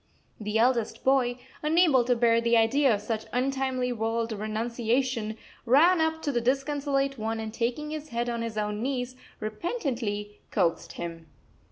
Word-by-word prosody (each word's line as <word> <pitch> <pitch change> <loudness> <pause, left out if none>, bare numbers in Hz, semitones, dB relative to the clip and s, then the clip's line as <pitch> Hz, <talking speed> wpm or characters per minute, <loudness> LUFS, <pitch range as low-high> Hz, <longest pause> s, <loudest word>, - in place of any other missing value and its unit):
The 210 0 -1
eldest 230 -1 +1
boy, 255 -2 +3 0.2
unable 305 -4 +4
to 245 0 +3
bear 230 -1 +3
the 235 0 +3
idea 260 +4 +4
of 205 - -5
such 220 0 -3
untimely 260 -1 0
world 225 0 -1
renunciation, 225 +2 -1 0.3
ran 320 +8 +5
up 320 0 0
to 290 - 0
the 240 -3 0
disconsolate 275 +1 0
one 225 +1 -2
and 220 -1 -5
taking 250 +7 -2
his 310 0 -6
head 235 0 -2
on 235 -1 -2
his 230 -2 -4
own 210 0 -1
knees 255 -1 -2 0.2
repentantly 215 - -3
coaxed 170 -1 0
him. 165 -1 -6
240 Hz, 155 wpm, -27 LUFS, 220-270 Hz, 0.3 s, ran